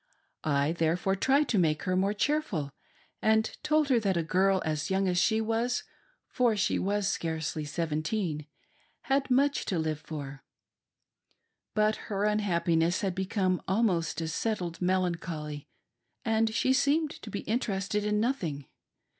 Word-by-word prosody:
I 145 0 +2
therefore 170 +3 +1
tried 270 +8 +3
to 210 - +3
make 155 -3 +1
her 185 -1 0
more 195 +3 +1
cheerful, 210 - 0 0.5
and 220 0 +2
told 305 -1 +2
her 250 -3 +4
that 195 -4 0
a 170 - +1
girl 190 +3 +2
as 155 -2 -1
ybung 190 0 +1
as 180 -1 +2
she 220 +5 +3
was 225 +2 0 0.2
— - - -40
for 240 -4 +3
she 195 - +1
was 200 0 0
scarcely 160 -3 -2
seventeen 155 +1 -2 0.3
— - - -37
.had 275 0 +2
much 280 +3 +3
to 185 - -1
live 155 -2 -1
for. 145 -3 -7 1.3
But 215 0 +3
her 200 -1 -1
unhappiness 175 -5 +1
had 195 -3 0
become 185 -1 0
almost 190 -6 +1
a 160 - -2
settled 175 0 -2
melancholy 170 -5 -1 0.6
and 225 -1 +2
she 255 +4 +2
seemed 290 +3 +2
to 220 - -8
be 200 - -4
interested 210 -3 -1
in 210 0 +1
nothing. 175 - -1
190 Hz, 150 wpm, -29 LUFS, 165-220 Hz, 1.3 s, her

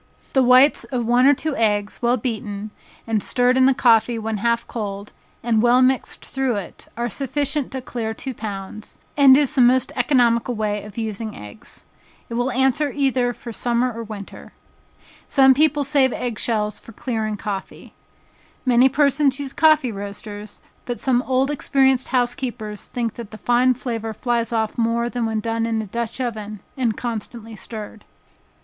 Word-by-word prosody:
The 265 - +4
whites 255 +3 +5
of 245 -3 -3
one 245 +3 +4
or 285 - +6
two 310 +1 -3
eggs, 210 -2 0
well 240 +1 +2
beaten, 215 -3 -4 0.3
and 225 -2 0
stirred 250 +3 +2
in 260 0 +5
the 270 - +5
coffee 230 -1 +3
when 220 -1 -3
half 235 +3 0
cold, 205 -2 -6 0.3
and 225 -2 +2
well 245 +2 +5
mixed 260 0 0
through 265 -3 -1
it, 200 -4 -7
are 240 0 -1
sufficient 280 +3 -2
to 265 -1 -4
clear 230 -3 -4
two 265 +2 -5
pounds, 210 -1 -7 0.2
and 275 -2 +7
is 295 0 +1
the 270 - +3
most 250 +1 +4
economical 245 -2 +2
way 210 -1 -1
of 210 0 -12
using 220 -1 -4
eggs. 105 0 -11 0.4
It - - -6
will 245 +2 0
answer 265 +3 +1
either 260 -3 +1
for 235 0 -9
summer 245 +2 0
or 230 - -6
winter. 210 -3 -10 0.7
Some 265 -1 +6
persons 295 0 +2
save 275 -3 +3
egg 240 -3 -4
shells 210 -3 -1
for 230 - -14
clearing 220 -2 -3
coffee. 200 -2 -6 0.7
Many 250 +1 +5
persons 280 0 +2
use 275 -1 -5
coffee 310 -6 +4
roasters, 205 +1 -8 0.2
but 245 -1 -4
some 250 -2 +2
old 265 +2 +1
experienced 265 -3 +2
housekeepers 240 -4 -2
think 235 -3 -3
that 235 -4 -9
the 215 - -10
fine 245 +2 +2
flavor 225 -3 -4
flies 235 -1 -1
off 220 0 -1
more 235 +1 +1
than 240 -2 -2
when 220 -1 -2
done 225 +1 -1
in 225 -1 -1
a 220 - -3
dutch 235 +4 -4
oven, 215 -4 -4
and 240 -5 -1
constantly 230 -1 -6
stirred. 215 0 -8
235 Hz, 170 wpm, -21 LUFS, 220-260 Hz, 0.7 s, and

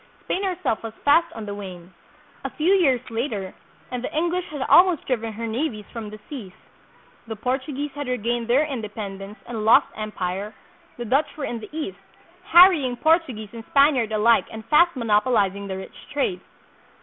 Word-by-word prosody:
Spain 385 - -1
her 375 -3 -1
self 220 - 0
was 225 -1 -7
fast 330 +4 +4
on 225 -2 -7
the 205 - -5
wane. 185 -3 -9 0.5
A - - -2
few 335 +5 +1
years 270 -10 +2
later 225 -5 -3 0.4
and 250 -1 -4
the - - -4
English 345 +2 0
had 290 -3 -4
almost 355 0 +5
driven 230 -3 -1
her 230 +2 -5
navies 225 -2 -3
from 225 -3 -6
the 215 - -9
seas, 225 -11 -8 0.7
the 220 - -5
Portuguese 265 +5 -3
had 290 -1 -6
regained 240 -1 -1
their 265 +6 +3
independence 210 -6 -6
and 225 -3 -5
lost 220 - +6
em 215 0 -5
pire, 190 +3 -4 0.4
the 240 - -5
Dutch 275 +8 0
were 290 - -3
in 235 - -4
the 215 - -10
East, 245 -12 -5 0.5
harrying 345 -10 +6
Portuguese 280 - +1
and 230 -1 -8
Spaniard 275 -6 +4
alike 220 +2 +4
and 220 -1 -9
fast 340 +4 +4
monopolizing 210 -4 +1
the 190 -1 -4
rich 190 - -9 0.2
trade. 225 -10 -1
235 Hz, 175 wpm, -23 LUFS, 210-290 Hz, 0.7 s, lost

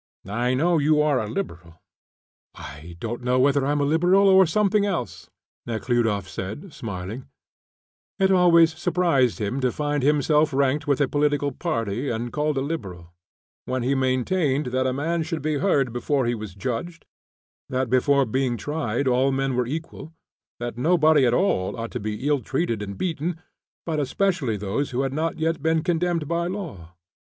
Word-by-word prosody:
"I 120 +6 0
know 165 +4 +2
you 150 +1 +3
are 150 -3 +3
a 105 - -3
Liberal." 85 - -6 0.8
"I 80 +4 -10
don't 120 +4 -4
know 125 +1 +1
whether 140 +1 +3
I 140 - 0
am 145 0 +1
a - - +2
Liberal 175 +6 +4
or 190 -1 +6
something 205 +3 +2
else," 185 -12 -3 0.4
Nekhludoff 115 -3 0
said, 105 - -7
smiling; 105 +3 -6 0.9
it 195 -1 +3
always 170 -3 +5
surprised 165 -7 +1
him 110 +4 -2
to 130 -2 +1
find 145 0 -1
himself 150 +2 +2
ranked 140 +2 +1
with 140 -1 +2
a 140 - +3
political 145 0 +1
party 120 - -2
and 120 +1 -3
called 150 -1 0
a - - +1
Liberal, 95 - -6 0.5
when 130 -1 -2
he 130 +3 +1
maintained 135 +3 +1
that 130 0 +1
a - - +1
man 165 +6 -1
should 160 -2 -4
be 155 -2 0
heard 140 - +1
before 130 +2 0
he 120 - +1
was 105 -5 -7
judged, 130 - -4 0.6
that 130 0 -1
before 135 +3 +3
being 125 +1 -1
tried 140 0 -2
all 130 +2 +3
men 135 -1 -1
were 125 -1 0
equal, 160 +2 -6 0.5
that 120 0 -5
nobody 155 -2 +4
at 120 - +2
all 125 - 0
ought 115 - -5
to - - -4
be 110 +5 -4
ill 145 -1 +2
treated 115 -10 -2
and 100 -1 -6
beaten, 170 -1 -2 0.5
but 160 -2 -1
especially 145 - 0
those 105 +8 -2
who 125 +1 -1
had 135 -1 -2
not 160 +3 -1
yet 160 0 -1
been 160 0 +1
condemned 175 -2 0
by 170 +1 -1
law. 150 - -7
140 Hz, 175 wpm, -24 LUFS, 120-160 Hz, 0.9 s, or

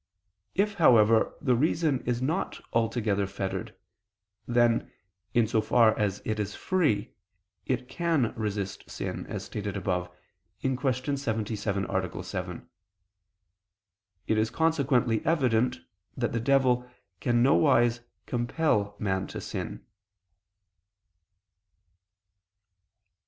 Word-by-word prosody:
If, 205 +2 +2
however, 115 -5 +5
the 130 - +2
reason 155 +1 +1
is 125 0 0
not 160 +8 -1
altogether 115 -3 +1
fettered, 95 0 -4 0.7
then, 120 -1 +2 0.4
in 120 -1 +5
so 110 0 +1
far 110 0 +4
as 105 -1 -1
it 110 -1 -1
is 105 -1 -3
free, 150 - 0 0.5
it 125 -1 -1
can 165 -9 0
resist 105 -3 -4
sin, - - -5
as - - -5
stated 100 -1 -4
above 90 -2 -1 0.5
(Q. 130 -1 0 0.2
77, 110 -7 -2
A. 95 -1 -2
7). 90 -2 -6 1.6
It 110 - +1
is 110 0 +1
consequently 135 -8 +1
evident 125 - +2 0.4
that - - 0
the 115 - -1
devil 125 -1 +2 0.3
can 120 0 +2
nowise 120 -4 +4 0.3
compel 120 -4 0
man 95 -2 -1
to - - -6
sin. - - -6
115 Hz, 105 wpm, -28 LUFS, 105-130 Hz, 1.6 s, however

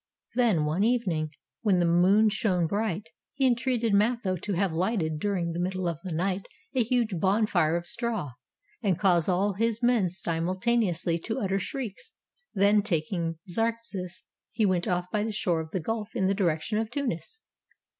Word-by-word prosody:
Then 225 -11 +3
one 160 +6 +1
evening, 200 -10 +1 0.3
when 205 -5 +3
the 175 - +3
moon 185 +6 +5
shone 190 -4 +1
bright, 200 0 -2 0.3
he 270 -1 +2
entreated 240 -3 +1
Mitho 210 -2 +2
to 200 +3 -4
have 185 -1 0
lighted 165 -3 0
during 180 -3 -1
the 165 - -4
middle 185 0 -1
of 165 -2 -3
the 185 - -6
night 185 +4 -1 0.3
a 260 - +2
huge 230 -6 +1
bonfire 190 -5 +2
of 170 - -5
straw, 220 - -2 0.5
and 195 -7 +1
cause 180 -4 +3
all 195 +3 +2
his 230 +3 -1
men 240 -6 +4
simulta 180 +6 -1
neously 175 -6 0
to 225 - -2
utter 195 -1 0
shrieks; 255 - -6 0.4
then 205 +1 +4
taking 165 -3 -1
Zarxas, 200 -3 -2 0.3
he 220 -1 +1
went 185 -3 +1
off 180 0 0
by 210 -1 +1
the 220 - -2
shore 180 -5 0
of 160 - -8
the 185 - -2
gulf 215 +5 -4
in 190 - +1
the 195 - +3
direction 190 +2 0
of 220 -1 -2
Tunis. 280 - -4
195 Hz, 175 wpm, -27 LUFS, 175-225 Hz, 0.5 s, moon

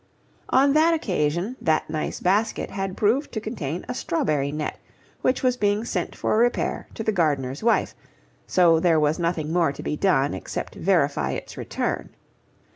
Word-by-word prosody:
On 275 +2 +4
that 320 +2 +4
occasion 180 - -1
that 155 -1 +1
nice 155 -1 -3
basket 205 +5 +1
had 195 -1 -4
proved 240 +8 +1
to 220 - -1
contain 180 - -4
a - - -3
strawberry 150 -4 -1
net 150 0 -4 0.4
which 255 - +1
was 250 -1 +2
being 205 0 +1
sent - - -3
for 215 - +1
repair 240 +1 0
to 220 - -4
the 220 - +1
gardener's 145 -8 0
wife; 230 +1 +2 0.5
so 170 -3 +4
there 165 -2 +3
was 150 +2 +1
nothing 165 -2 -1
more 170 -4 +3
to - - -9
be - - -2
done 145 -6 +2
except 95 - -5
verify - - +1
its - - -6
return. - - -3
180 Hz, 165 wpm, -24 LUFS, 155-220 Hz, 0.5 s, On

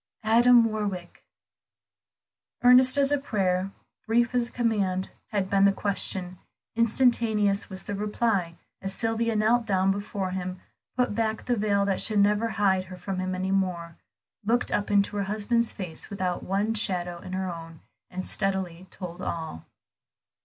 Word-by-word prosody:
"Adam 235 +2 +6
Warwick." 205 -5 -3 1.4
Earnest 255 +2 +7
as 280 0 +3
a 290 - +2
prayer, 190 -7 0 0.4
brief 235 +2 +2
as 245 -1 +1
a - - -16
command 200 -6 0 0.2
had 200 -3 -1
been 195 0 +3
the 200 - +6
question, 190 -2 -2 0.4
instantaneous 225 -3 +2
was 190 -1 -4
the 205 - -5
reply, 205 -4 -1 0.3
as 195 0 -4
Sylvia 225 0 0
knelt 225 +2 +2
down 190 -1 +2
before 200 -1 -3
him, 185 0 -4 0.4
put 250 -4 +1
back 220 0 -1
the 245 - +1
veil 205 -2 +1
that 195 -1 +1
should 215 - +2
never 205 +2 +3
hide 195 -4 +1
her 185 0 -10
from 190 0 -4
him 185 0 -2
any 190 +1 -2
more, 180 -4 -1 0.5
looked 235 +4 +1
up 205 - 0
into 205 0 +2
her 200 - 0
husband's 220 +3 0
face 180 -6 -6
without 185 -3 -2
one 200 +3 0
shadow 180 -5 -2
in 185 +1 -9
her 190 0 -2
own, 165 -2 -8 0.3
and 185 +1 -5
steadily 190 -2 -2
told 175 -3 -8
all. 160 - -5
200 Hz, 155 wpm, -26 LUFS, 185-225 Hz, 1.4 s, Earnest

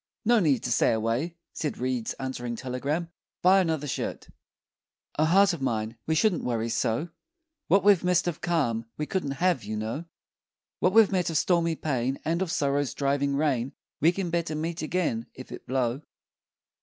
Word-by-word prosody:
"No 235 +1 +5
need 150 - +2
to 120 - -2
stay 115 - +3
away," 115 +10 -1 0.2
said 150 - -3
Reed's 125 -2 -2
answering 125 -3 -4
telegram; 140 +7 -3 0.3
"buy 190 +2 +6
another 160 -4 -1
shirt." 140 - -4 0.9
O 155 - +5
heart 195 +4 +5
of 165 - -6
mine, 110 -3 -1
we 160 - +2
shouldn't 185 +3 +2
Worry 115 -2 -1
so! 115 +7 0 0.6
What 195 -1 +4
we've 200 -3 +5
missed 180 -1 +2
of 175 - -3
calm 130 -10 0
we 150 - -2
couldn't 145 -6 -2
Have, 175 -10 +2
you 105 +1 -4
know! 115 +10 -4 0.7
What 185 - +2
we've 220 -2 +6
met 185 -3 +1
of 160 - 0
stormy 170 -1 +2
pain, 135 -3 -1
And 165 +3 0
of 190 - -1
sorrow's 140 -4 0
driving 140 0 0
rain, 135 -4 0 0.3
We 160 +4 +5
can 180 -1 -3
better 170 -2 -1
meet 165 +2 -3
again, 155 -8 -1
If 130 - -10
it - - -9
blow! 130 0 0
150 Hz, 175 wpm, -27 LUFS, 125-175 Hz, 0.9 s, buy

